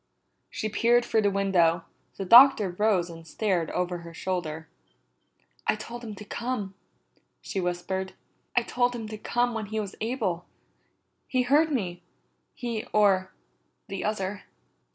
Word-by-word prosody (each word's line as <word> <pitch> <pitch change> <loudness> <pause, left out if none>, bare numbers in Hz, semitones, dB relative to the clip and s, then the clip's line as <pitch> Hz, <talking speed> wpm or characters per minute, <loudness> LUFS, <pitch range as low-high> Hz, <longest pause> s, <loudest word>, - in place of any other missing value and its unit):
She 215 - -3
peered 235 +3 +3
through 220 - +2
the 205 - +3
window; 180 -4 +2 0.3
the 195 - -3
Doctor 235 -2 +8
rose 190 -2 +2
and 165 -1 -11
stared 180 -2 0
over 180 -1 -2
her 170 -1 -11
shoulder. 165 -3 -3 1.0
"I - - +3
told 235 +3 -8
him 220 -3 -6
to 210 - -10
come," 235 -3 -3 0.7
she 195 - -4
whispered. 180 +2 -3 0.4
"I 245 - +4
told 245 +1 0
him 225 -2 -5
to 215 - -6
come 240 +2 0
when 220 -2 -4
he 220 +2 -2
was 200 -2 -4
able. 215 -7 -1 0.8
He 255 -1 +1
heard 300 +5 +3
me, 185 -10 -2 0.5
he 230 -3 -4
or 195 -3 +3 0.6
the 195 -1 -4
other." 205 -1 -3
205 Hz, 145 wpm, -27 LUFS, 180-235 Hz, 1.0 s, Doctor